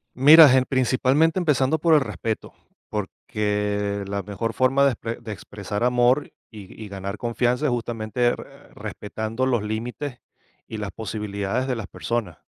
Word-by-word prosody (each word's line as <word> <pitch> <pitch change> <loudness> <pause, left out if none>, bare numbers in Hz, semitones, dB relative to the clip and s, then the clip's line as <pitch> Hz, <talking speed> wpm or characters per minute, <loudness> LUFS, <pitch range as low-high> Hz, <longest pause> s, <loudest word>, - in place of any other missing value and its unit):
Mira, 150 +4 +9
ge 130 0 +5
principalmente 135 +6 +2
empezando 150 -2 +2
por 165 0 +4
el - - +6
respeto, 115 -4 -4 0.4
porque 105 0 -2
la 100 0 -2
mejor 105 +4 -4
forma 130 +2 +3
de 140 - +4
exp 115 0 -5
de 110 - -6
expresar 105 +1 -5
amor 125 +3 +2 0.2
y 105 -4 -10
ga - - -15
y 105 - -7
ganar 100 +1 -6
confianza 120 +4 0
es 145 - +2
justamente 120 0 -1
r - - -1 0.3
respetando 110 +4 -4
los 120 -5 +1
límites 120 +5 -4 0.5
y 110 - -6
las 105 -2 -4
posibilidades 105 +1 -3
de 125 - 0
las 110 -5 -6
personas, 110 -8 -3
115 Hz, 160 wpm, -23 LUFS, 105-130 Hz, 0.5 s, Mira